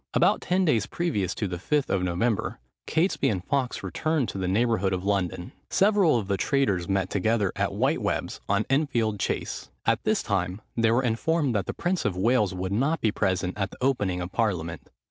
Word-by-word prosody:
About - - +3
ten 185 +1 +1
days 120 - +2
previous 105 - -1
to 105 - -2
the 90 -1 -5
Fifth 145 - 0
of 95 - +1
November, 90 +5 0 0.3
Catesby 160 -4 +1
and 95 -5 -2
Fawkes 135 -3 -1
returned 155 -5 -1
to 95 - -5
the 95 - -1
neighbourhood 100 -1 +1
of 90 0 -2
London. 95 -3 -1 0.2
Several 195 - +4
of 105 -4 -3
the 100 -1 0
traitors 100 - +1
met 95 -1 0
together 105 0 +1
at - - 0
White - - +1
Webbs, - - -2
on 100 +2 +2
Enfield 120 -7 +1
Chase. - - -3 0.2
At - - +2
this - - +1
time, 95 -1 -1 0.2
they 115 -1 +3
were 120 +3 +3
informed, 135 +4 +1
that 100 -4 -1
the - - -3
prince 175 +1 -1
of 95 -3 -1
Wales 105 0 +2
would 95 0 -4
not 140 +9 +1
be 110 - +1
present 95 -3 -1
at 100 0 0
the - - -13
opening 105 -9 0
of 90 +1 -5
parliament. 85 - -2
105 Hz, 200 wpm, -26 LUFS, 95-135 Hz, 0.3 s, Several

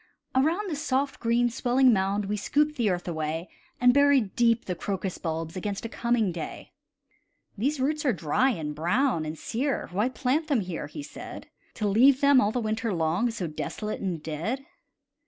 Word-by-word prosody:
Around 320 +10 +2
the 330 - -2
soft, 275 0 -1
green 235 +1 +2
swelling 255 +1 +3
mound 195 +1 0
We 205 +2 -1
scooped 295 +8 +1
the 235 -6 +1
earth 180 -1 -2
away, 160 +1 -3 0.3
And 245 0 +6
buried 280 -7 +4
deep 235 -1 +3
the 180 - -2
crocus 190 +1 -4
bulbs 165 0 -3
Against 200 +3 -4
a - - -3
coming 235 -4 +1
day. 165 -2 -7 0.8
"These 270 +8 -1
roots 300 +3 0
are 275 - +3
dry, 180 - +1
and 155 - -3
brown, 170 - +1
and 155 +1 -5
sere; 265 - -2
Why 210 +7 +1
plant 270 +5 0
them 275 -8 +2
here?" 180 -3 -5
he 295 - -7
said, - - -9 0.3
"To 215 - -1
leave 255 +7 +5
them, 280 -2 +6
all 205 - +2
the 245 - -1
winter 220 0 -1
long, 170 +6 +1
So 215 -6 -4
desolate 210 +7 -4
and 175 -6 -3
dead." 205 - -3
225 Hz, 180 wpm, -27 LUFS, 180-265 Hz, 0.8 s, And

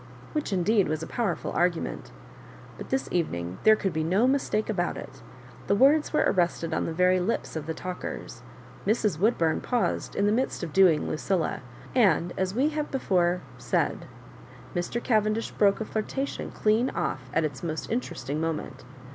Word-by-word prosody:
which, 300 -6 -2
indeed, 195 +2 +2
was 155 +1 -2
a - - -3
powerftil 210 -8 -2
argu 175 0 +3
ment. - - -6 0.7
But - - -9
this 265 0 0
evening 90 - -2
there 220 0 +7
could 195 -3 -2
be 160 - 0
no 190 +9 +3
mistake 260 -5 +1
about 185 -5 -1
it - - -10 0.5
The 200 - +3
words 285 +7 +4
were 300 - +3
arrested 170 -2 +1
on - - 0
the - - -2
very 180 +2 +3
lips 185 +1 -2
of 155 -1 -4
the 160 - -3
talkers; 180 0 -6 0.5
Mrs. 210 -6 +1
Wbodbuni 170 -6 +2
paused 245 -2 -1
in 200 - +2
the 205 - +3
midst 245 -3 0
of 165 -3 -5
doing 180 -6 +5
LucUla, 170 +1 -1 0.3
and, 185 -8 +3
as 190 +1 -1
we 275 +5 +3
have 300 -1 -3
before 180 -9 +1 0.2
said, - - -1 0.7
Mr. 175 +4 -2
Cavendish 215 -1 +1
broke 200 -1 +3
a 220 - -2
flirtation 265 +7 -3
clean 220 +4 +2
off 130 -1 -3
at 165 +3 +1
its 140 -3 -5
most 160 -2 -4
interesting 155 - -3
moment. 160 -1 -3
190 Hz, 170 wpm, -27 LUFS, 165-225 Hz, 0.7 s, there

